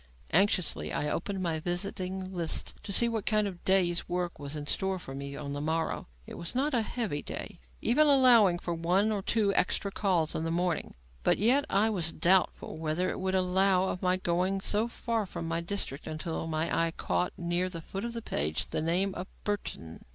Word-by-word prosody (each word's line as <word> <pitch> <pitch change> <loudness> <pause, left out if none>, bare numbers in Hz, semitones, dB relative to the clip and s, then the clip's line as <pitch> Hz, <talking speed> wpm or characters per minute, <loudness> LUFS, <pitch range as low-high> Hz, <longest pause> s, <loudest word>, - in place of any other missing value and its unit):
Anxiously, 190 0 +2
I 150 0 -1
opened 195 -2 -3
my 165 -2 -1
visiting 185 +2 -3
list 170 -3 -1
to 205 - -6
see 235 +4 +7
what 225 -3 -3
kind 215 -1 +3
of 185 -3 -6
day's 180 -3 +2
work 175 -1 -2
was 145 +1 -6
in 150 -1 -5
store 190 +5 0
for 155 -7 -9
me 140 +1 -6
on 140 0 -5
the 145 - -4
morrow. 160 +2 -1 0.2
It - - -9
was 170 +6 -4
not 280 +3 +1
a 240 - +3
heavy 215 -10 -2
day, - - -7 0.2
even 300 +7 +4
allowing 245 -10 +6
for 175 0 -4
one 180 +6 +2
or 205 -2 -1
two 205 0 +1
extra 200 +2 +1
calls 180 -6 +1
in 160 - -2
the 165 - -1
morning, 175 -1 -1 0.3
but - - +3
yet 255 +7 +3
I 210 +3 +3
was 170 -6 0
doubtful 180 +1 +2
whether 160 +3 0
it - - -5
would 190 0 -1
allow 190 0 +3
of 180 - -4
my 185 -1 +2
going 185 +2 0
so 215 +3 +1
far 230 -3 -2
from 165 -2 -5
my 165 +1 -1
district, 170 -6 -3
until 160 +1 -4
my 160 +1 -1
eye 165 - -5
caught, 180 - -1
near 175 +1 0
the 170 -2 -6
foot 195 +5 -6
of 235 0 -3
the 230 -1 -5
page, 75 +1 -1
the - - 0
name 180 +5 +1
of 180 +1 -6 0.2
Burton. 140 - -4
180 Hz, 205 wpm, -30 LUFS, 165-200 Hz, 0.3 s, see